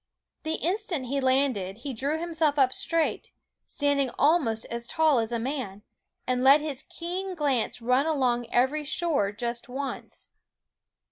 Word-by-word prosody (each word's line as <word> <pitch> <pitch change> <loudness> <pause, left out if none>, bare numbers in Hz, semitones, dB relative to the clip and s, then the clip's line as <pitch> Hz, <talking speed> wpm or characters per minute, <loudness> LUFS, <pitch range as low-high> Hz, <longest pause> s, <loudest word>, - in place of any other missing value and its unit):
The 320 0 -2
instant 355 -6 -2
he 275 +3 -1
landed 260 -8 +1
he 265 +3 -6
drew 280 +7 -1
himself 320 -3 +1
up 260 -2 +4
straight, 330 -1 0 0.3
standing 285 -2 +1
almost 280 -8 +2
as 235 0 -4
tall 310 -5 +3
as 225 0 -2
a 235 - 0
man, 230 -5 -4 0.4
and 250 0 0
let 275 +3 +7
his 295 -3 -3
keen 365 +2 -4
glance 270 -6 -1
run 255 +5 +2
along 250 -6 +1
every 265 +6 +1
shore 295 -8 0
just 235 +3 -5
once. 270 +2 -5
275 Hz, 145 wpm, -27 LUFS, 240-310 Hz, 0.4 s, let